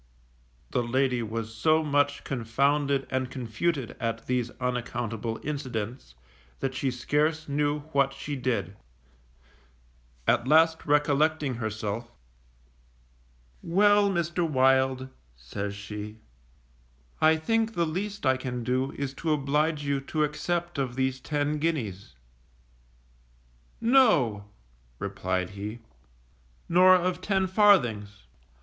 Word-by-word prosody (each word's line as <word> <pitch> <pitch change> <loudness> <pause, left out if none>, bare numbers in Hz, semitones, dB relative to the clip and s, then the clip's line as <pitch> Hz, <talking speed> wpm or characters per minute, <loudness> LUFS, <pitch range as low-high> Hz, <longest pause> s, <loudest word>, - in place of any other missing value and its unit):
_ - - -33
The - - +1
lady 125 +1 +1
was 115 0 -4
so 155 +8 +2
much 145 -1 +1
confounded 140 +3 0
and 130 -1 -1
confuted 130 +2 -2
at 115 -1 -3
these 125 -2 -1
unaccountable 120 -2 -3
incidents, 125 - -5 0.4
that 135 -1 -2
she 130 +1 -1
scarce 150 +5 0
knew 145 +1 0
what 140 -2 +2
she 135 +2 -5
did; 125 -7 -2 1.5
at 120 - +2
last 160 +2 +4
recollecting 150 0 +2
herself, 110 0 -4 1.5
Well, 205 +3 +4
Mr. 170 -1 -1
Wild, 130 -1 +3 0.3
says 100 +12 -5
she; 105 +1 -7 1.0
I 160 0 +6
think 225 +6 0
the 170 - +2
least 195 +4 -4
I 130 0 +3
can 125 -2 -4
do 130 +3 -1
is 140 -1 -4
to 160 +3 -2
oblige 150 +1 +1
you 140 -1 0
to 155 +3 -1
accept 170 +2 -2
of 130 -3 -2
these 130 0 0
ten 145 +1 -1
guineas. 115 - -3 1.6
No, 190 - +4 0.5
replied 90 +5 -2
he, 105 +3 -6 0.9
_nor 185 +2 +6
of 180 0 -1
ten 190 -1 +1
farthings. 120 - +3
135 Hz, 110 wpm, -27 LUFS, 120-155 Hz, 1.6 s, I